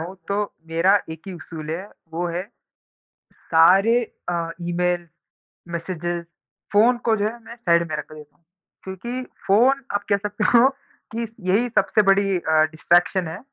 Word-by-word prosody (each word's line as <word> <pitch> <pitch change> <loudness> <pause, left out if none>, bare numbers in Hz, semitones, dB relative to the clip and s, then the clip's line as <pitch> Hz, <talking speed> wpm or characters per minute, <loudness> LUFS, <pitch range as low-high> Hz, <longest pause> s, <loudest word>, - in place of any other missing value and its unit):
हूँ, 175 +4 -7
तो 205 +1 -1
मेरा 165 +4 +3 0.2
एक 160 -1 -7
ही 195 - -6
उसूल 160 -2 -8
है, 180 +5 -4 0.2
वो 175 +2 -2
है, 175 +2 -3 1.1
सारे 195 +9 +5 0.3
अ, 170 -1 -1
ईमेल, 175 0 -1 0.7
मैसेजेस, 170 0 -3 0.5
फ़ोन 225 +4 +5
को 225 -1 +3
जो 205 0 0
है 230 +2 -4
मैं 230 - -10
साइड 170 -7 +2
में 150 - -1
रख 150 - -7
ले 155 0 -9 0.6
क्योंकि 235 +7 -5 0.2
फ़ोन 255 +8 +4
आप 205 - -1
कह 200 - +5
सकते 205 +1 -3
हो 250 +3 +6 0.5
कि 230 - -2 0.3
यही 225 +6 +2
सबसे 215 - +3
बड़ी 195 -1 +3
अ, 160 -2 +2
डिस्ट्रैक्शन 175 +3 +2
है। 165 +3 -6
185 Hz, 155 wpm, -22 LUFS, 170-205 Hz, 1.1 s, हो